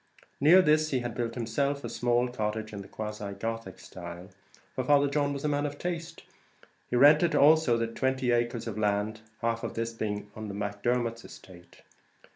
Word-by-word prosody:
Near 170 +7 +7
this 155 -1 +3
he 130 -4 0
had 120 -1 -4
built 115 -1 -3
himself 140 +4 -1
a - - -3
small 120 +1 +1
cottage 110 -2 -3
in 100 - -5
the 95 - -11
quasi 105 -2 -6
Gothic 115 -1 -5
style, 85 +1 -9 0.4
for 130 - -2
Father 145 +2 +4
John 145 0 0
was 140 +1 -4
a - - +3
man 145 0 0
of 145 0 -7
taste; 170 -1 -5 0.7
he - - -1
rented 150 +6 +6
also 150 -5 +5
about 115 0 -3
twenty 130 -1 0
acres 120 0 0
of 110 -2 -5
land, 105 +1 0 0.2
half 115 0 0
of - - -4
this 115 0 -2
being 105 -2 -4
on 110 0 -6
the 100 - -6
Macdermots' 115 +3 -1
estate. 90 -2 -15
120 Hz, 185 wpm, -29 LUFS, 105-140 Hz, 0.7 s, Near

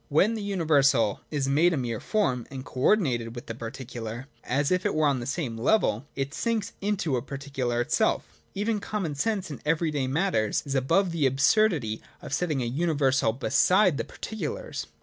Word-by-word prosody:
When 185 +10 +3
the 220 - -4
universal 145 - +2
is 140 -3 -1
made 160 +6 +4
a - - 0
mere 120 -4 -2
form 130 - 0
and 135 -1 -7
co 130 - -8
ordinated 125 - +2
with 120 +3 -7
the 115 - -5
particular, 115 0 -6 0.2
as 140 +4 0
if 185 0 +2
it 205 - 0
were 155 0 +3
on 140 -3 +2
the 120 - -5
same 135 -6 -3
level, 130 - +2
it 135 +1 -3
sinks 230 +1 -1
into 195 -9 0
a - - -2
particular 135 -3 -3
itself. 120 - 0
Even 210 +2 0
common 200 -7 -3
sense 195 +3 -1
in 145 - -7
every 160 +1 +1
day 140 -3 -1
matters 135 - +1
is 140 - -3
above 165 +8 +2
the 160 -5 +2
absurdity 135 - +2 0.2
of - - -8
setting 150 -5 0
a - - -2
universal 135 -3 +1
beside 180 - +3
the - - 0
particulars. - - -5
145 Hz, 185 wpm, -27 LUFS, 125-185 Hz, 0.2 s, made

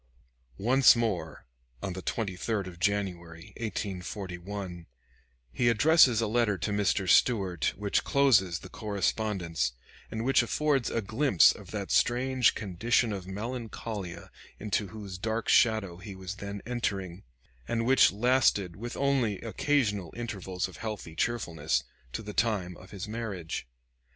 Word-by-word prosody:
Once 125 +5 +6
more, 95 -10 -2 0.4
on 95 - -2
the 95 - -6
23d 100 0 -2
of 90 -2 -10
January, 90 -4 -2
1841, 95 -4 -5 0.6
he 120 -1 +2
addresses 130 0 +5
a 115 - +1
letter 110 -2 +1
to 105 - -2
Mr. 100 -1 +1
Stuart, 95 - +3
which 100 0 0
closes 110 -11 +3
the 95 - -11
correspondence, 100 - -1 0.4
and 110 +1 -4
which 135 -1 +4
affords 140 +1 +1
a 115 - -1
glimpse 110 - +5
of - - -13
that - - -4
strange 125 0 +3
condition 110 +3 +1
of 95 -2 -6
melancholia 110 -2 -6 0.3
into 105 0 -1
whose 100 -3 -8
dark 110 +3 -2
shadow 110 -7 +3
he 95 +2 -9
was 95 +1 -7
then 100 0 -6
entering, 100 -7 -3 0.5
and 115 -1 -1
which 135 +2 +6
lasted, 105 -5 +2
with 120 +5 -6
only 135 -7 +1
occasional 110 - 0
intervals 95 -6 -3
of 95 - -12
healthy 105 -7 -6
cheerfulness, 80 - 0 0.3
to 110 - -5
the 105 0 -7
time 100 -7 0
of 95 - -14
his 100 +1 -6
marriage. 105 - -5
105 Hz, 135 wpm, -29 LUFS, 95-115 Hz, 0.6 s, Once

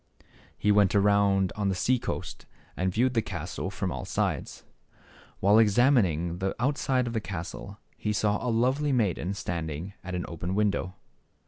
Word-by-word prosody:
He 105 - +2
went 100 -1 +4
around 100 -2 +3
on 105 -2 0
the 95 - 0
sea 125 +7 +2
coast - - -5 0.3
and 95 0 0
viewed 125 +6 +1
the 115 - +2
%3. - - -17
castle - - -4
from - - -3
all - - -4
sides. - - -2 0.8
While 105 +3 +5
examining 100 - +3
the 95 0 -1
outside 130 0 +1
of 120 - -4
the 110 - -1
castle, 100 +2 -6 0.2
he 105 - -2
saw 105 0 0
a 125 - 0
lovely 130 +6 +1
maiden 100 -6 0
standing 85 -2 -4
at 95 0 -5
an 90 - -3
open 85 +3 -4
window. 100 -3 0
100 Hz, 165 wpm, -28 LUFS, 90-115 Hz, 0.8 s, While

